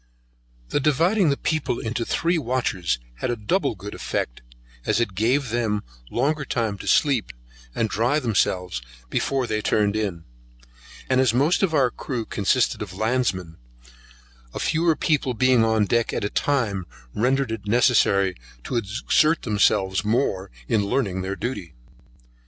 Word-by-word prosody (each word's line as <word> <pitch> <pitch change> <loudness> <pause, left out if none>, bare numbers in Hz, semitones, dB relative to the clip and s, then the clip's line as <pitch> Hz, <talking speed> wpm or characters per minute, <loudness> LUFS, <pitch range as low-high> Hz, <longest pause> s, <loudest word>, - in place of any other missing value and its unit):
The - - +1
dividing 165 +6 +3
the 140 - +1
people 140 -7 -1
into 115 +1 -2
three 170 +7 0
watches 120 - -1 0.2
had - - -2
a 120 - 0
double 140 - 0
good 100 +2 -8
effect - - -3 0.4
as 110 - +1
it 115 -5 0
gave 120 +7 +1
them 110 -3 -1 0.3
longer 145 +5 0
time 115 -6 -2
to - - -8
sleep, 135 -7 +2 0.4
and 110 - +1
dry 115 +7 +1
themselves 95 - 0 0.3
before 135 -2 0
they 110 -2 -1
turned 105 -1 +1
in; 100 -6 -2 0.8
and 130 0 +3
as 120 -3 +2
most 145 +7 +3
of 180 -5 +1
our 130 -4 +3
crew 120 -4 -4
consisted 110 +5 +1
of 95 -3 -6
landsmen, 110 -8 -1 0.9
the - - -6
fewer 165 +1 +2
people 145 -5 0
being 130 0 +4
on 110 -2 +2
deck 115 +2 +1
at - - -2
a 105 - -2
time, 105 -11 0 0.3
rendered 130 +2 +1
it 110 -2 -5
necessary 100 -5 +3 0.3
to 125 - -2
exert 120 +9 +1
themselves 100 -3 +2
more 105 -4 0 0.2
in 105 -2 +2
learning 100 -3 -1
their 95 +1 -3
duty. 100 - -5
115 Hz, 150 wpm, -24 LUFS, 100-135 Hz, 0.9 s, being